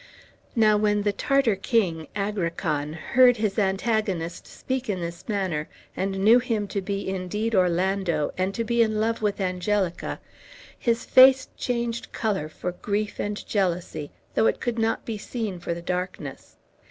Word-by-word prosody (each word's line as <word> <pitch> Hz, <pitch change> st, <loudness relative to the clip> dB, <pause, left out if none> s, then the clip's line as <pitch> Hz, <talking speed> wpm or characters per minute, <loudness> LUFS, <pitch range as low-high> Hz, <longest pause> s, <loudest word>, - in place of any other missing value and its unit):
Now 215 Hz, -2 st, +5 dB
when 210 Hz, -1 st, +2 dB
the 205 Hz, -1 st, +1 dB
Tartar 275 Hz, -2 st, +2 dB
king, 190 Hz, -, 0 dB
Agrican, 170 Hz, -7 st, -2 dB
heard 245 Hz, +8 st, +4 dB
his 215 Hz, -1 st, 0 dB
antagonist 195 Hz, -4 st, -1 dB
speak 260 Hz, -2 st, -4 dB
in 190 Hz, -3 st, -1 dB
this 170 Hz, +4 st, -6 dB
manner, 185 Hz, -7 st, -1 dB, 0.3 s
and 195 Hz, 0 st, -2 dB
knew 230 Hz, +3 st, +8 dB
him 225 Hz, -4 st, -1 dB
to 200 Hz, -, -2 dB
be 200 Hz, +1 st, -3 dB
indeed 195 Hz, +4 st, -2 dB
Orlando, 180 Hz, -3 st, +1 dB
and 185 Hz, +1 st, 0 dB
to 230 Hz, -, -1 dB
be 235 Hz, +1 st, +2 dB
in 220 Hz, -2 st, +2 dB
love 225 Hz, +1 st, 0 dB
with 210 Hz, -1 st, 0 dB
Angelica, 185 Hz, 0 st, -1 dB, 0.6 s
his 235 Hz, -1 st, 0 dB
face 260 Hz, 0 st, +7 dB
changed 235 Hz, -1 st, -2 dB
color 195 Hz, -9 st, -1 dB
for 180 Hz, +3 st, -4 dB
grief 205 Hz, +3 st, -3 dB
and 205 Hz, 0 st, -3 dB
jealousy, 175 Hz, -6 st, -1 dB, 0.2 s
though 220 Hz, -, +3 dB
it -, -, +1 dB
could 240 Hz, -1 st, -2 dB
not 225 Hz, 0 st, 0 dB
be 220 Hz, -3 st, -4 dB
seen 215 Hz, -5 st, -4 dB
for 170 Hz, 0 st, -3 dB
the 170 Hz, -, -8 dB
darkness. 180 Hz, -5 st, -5 dB
205 Hz, 155 wpm, -25 LUFS, 180-225 Hz, 0.6 s, knew